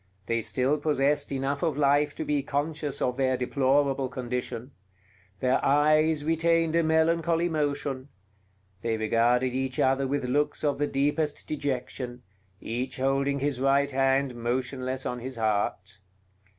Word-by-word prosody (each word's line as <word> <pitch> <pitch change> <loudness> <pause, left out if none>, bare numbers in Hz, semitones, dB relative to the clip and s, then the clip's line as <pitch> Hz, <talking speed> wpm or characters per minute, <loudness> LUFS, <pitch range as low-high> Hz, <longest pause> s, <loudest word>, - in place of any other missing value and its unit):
They 115 0 0
still 130 +6 0
possessed 145 -1 +1
enough 135 +1 -2
of 160 -5 0
life 145 0 +2
to - - -4
be 145 -1 +1
conscious 145 +1 -2
of 125 0 -1
their 130 -1 +1
deplorable 135 +1 +1
condition; 125 0 -4 0.7
their 130 0 +2
eyes 155 +2 +3
retained 165 0 +2
a 170 - +4
melancholy 165 +1 +2
motion; 145 -3 -2 0.7
they 115 0 -1
regarded 120 +3 +2
each 130 0 -2
other 135 +1 +2
with 140 -1 -1
looks 145 +5 0
of 145 -2 0
the 145 - +1
deepest 145 +2 -1
dejection, 125 -4 -4 0.4
each 125 +3 -4
holding 135 +1 0
his 140 -3 -1
right 140 +1 +3
hand 135 0 +2
motionless 130 +2 -3
on 125 - -3
his 130 +2 -6
heart. 100 -3 -1
135 Hz, 135 wpm, -27 LUFS, 125-145 Hz, 0.7 s, a